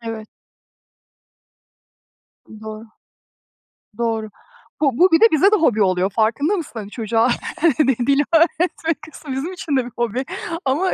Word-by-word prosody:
Evet. 225 -2 -7 2.2
Doğru. 220 0 -9 1.1
doğru. 225 -2 -2 0.5
Bu 275 -5 +1
bu 365 0 +5
bir 325 - +5
de - - +7
bize 385 +7 +4
de - - +6
hobi 230 - +2
oluyor, 185 0 +1
farkında 235 - +1
mısın 335 - -6
hani? 205 -1 -7
Çocuğa 225 +2 0 0.8
dil 280 0 +3
öğretmek 330 -1 +1
kısmı 290 -2 -9
bizim 275 +8 -3
için 310 -5 -3
de 260 - +1
bir 245 - -10
hobi 240 +2 -1 0.4
ama 300 +8 0
260 Hz, 130 wpm, -20 LUFS, 220-320 Hz, 2.2 s, de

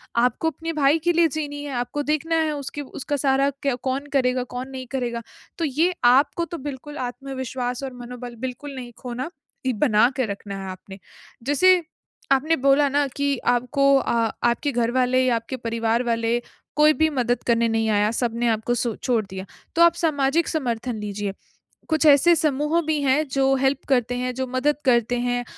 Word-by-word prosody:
आपको 250 +7 +2
अपने 330 +2 -5
भाई 300 +1 +3
के 345 - +3
लिए 335 0 +4
जीनी 290 -1 -4
है, 290 - -5
आपको 245 +4 -2
देखना 310 +3 0
है 315 -1 0
उसके 285 +1 -5
उसका 280 +1 -4
सारा 275 0 +2
क्या 275 -3 +1
कौन 275 +2 -2
करेगा, 255 -2 +2
कौन 250 +1 -6
नहीं 260 -2 -7
करेगा। 240 -3 -2 0.4
तो 335 - 0
ये 320 +6 +1
आपको 280 +7 +4
तो 340 - -6
बिल्कुल 295 +3 -8
आत्मविश्वास 260 -1 -5
और 265 -2 -5
मनोबल 245 0 -8
बिल्कुल 270 +3 -6
नहीं 245 -2 -7
खोना 250 +3 -4 0.5
बना 220 -1 +4
के 260 - +1
रखना 200 -1 -6
है 190 - -6
आपने। 190 +1 -11 0.4
जैसे 355 +7 +4 0.5
आपने 300 +5 +3
बोला 275 +2 +4
ना 285 +1 +2
कि 280 -1 +1
आपको 250 +3 +1
अ, 230 -4 +1
आपके 240 +5 +1
घर 240 -1 0
वाले 255 0 +2
या 245 -2 +3
आपके 230 +3 -4
परिवार 230 0 0
वाले 230 0 0 0.4
कोई 305 +1 +6
भी 315 +1 +2
मदद 245 -4 -1
करने 235 0 +3
नहीं 225 0 +1
आया, 210 0 +3
सबने 235 0 -1
सो - - +4
आपको 220 +2 -1 0.2
छोड़ 235 -5 0
दिया 190 0 -7 0.3
तो 335 - +3
आप 340 0 +6
सामाजिक 305 -1 +1
समर्थन 245 -6 -2
लीजिए। 205 -1 -4 0.6
कुछ 315 -1 +2
ऐसे 300 +4 +7
समूह 300 +2 +1
भी 310 -2 +1
हैं 280 +3 +2
जो 270 0 +2
हेल्प 270 +1 0
करते 245 -3 +2
हैं, 250 0 -2
जो 260 0 -2
मदद 255 +4 +1
करते 240 -1 +3
हैं 245 0 -1
260 Hz, 185 wpm, -23 LUFS, 240-290 Hz, 0.6 s, ऐसे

